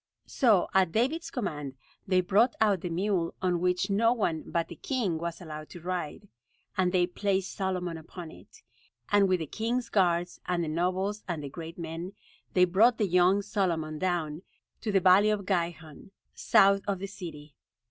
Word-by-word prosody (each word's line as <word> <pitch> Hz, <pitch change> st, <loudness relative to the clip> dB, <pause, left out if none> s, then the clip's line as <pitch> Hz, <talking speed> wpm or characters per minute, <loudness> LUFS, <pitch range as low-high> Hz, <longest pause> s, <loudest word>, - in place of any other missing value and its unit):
So 220 Hz, -, +3 dB
at 190 Hz, -3 st, +3 dB
David's 270 Hz, -, 0 dB
command 150 Hz, -, -4 dB, 0.3 s
they 185 Hz, -1 st, +3 dB
brought 205 Hz, +7 st, +3 dB
out 205 Hz, -5 st, +3 dB
the 180 Hz, -, -3 dB
mule 180 Hz, 0 st, -1 dB
on 180 Hz, -2 st, 0 dB
which 180 Hz, +2 st, 0 dB
no 230 Hz, +4 st, +3 dB
one 170 Hz, -9 st, -1 dB
but 170 Hz, -1 st, -1 dB
the 170 Hz, -, -9 dB
king 195 Hz, -, -2 dB
was 170 Hz, 0 st, -4 dB
allowed 155 Hz, -3 st, -8 dB
to 175 Hz, -, -10 dB
ride; 180 Hz, +2 st, -4 dB, 0.5 s
and 185 Hz, -2 st, +2 dB
they 180 Hz, -1 st, +3 dB
placed 190 Hz, +1 st, -1 dB
Solomon 180 Hz, -4 st, -2 dB
upon 165 Hz, +1 st, -9 dB
it; -, -, -17 dB, 0.5 s
and 205 Hz, -2 st, +4 dB
with 185 Hz, -2 st, +2 dB
the -, -, -2 dB
king's 230 Hz, -, -2 dB
guards, 175 Hz, -3 st, +1 dB
and 175 Hz, -1 st, 0 dB
the -, -, -3 dB
nobles, 185 Hz, +6 st, -1 dB
and 165 Hz, -5 st, -3 dB
the 140 Hz, -, -5 dB
great 165 Hz, +3 st, -8 dB
men, 170 Hz, +2 st, -6 dB, 0.4 s
they 180 Hz, -1 st, +6 dB
brought 215 Hz, +7 st, +4 dB
the 210 Hz, -, +1 dB
young 180 Hz, +2 st, +3 dB
Solomon 170 Hz, -7 st, -1 dB
down 175 Hz, -4 st, -1 dB, 0.4 s
to 220 Hz, -, -3 dB
the 195 Hz, -, +4 dB
valley 190 Hz, +4 st, +6 dB
of 210 Hz, -2 st, -1 dB
Gihon, 170 Hz, -5 st, -3 dB, 0.2 s
south 195 Hz, 0 st, +4 dB
of 200 Hz, -1 st, 0 dB
the 190 Hz, -, -5 dB
city. 160 Hz, -7 st, -9 dB
180 Hz, 180 wpm, -28 LUFS, 170-200 Hz, 0.5 s, they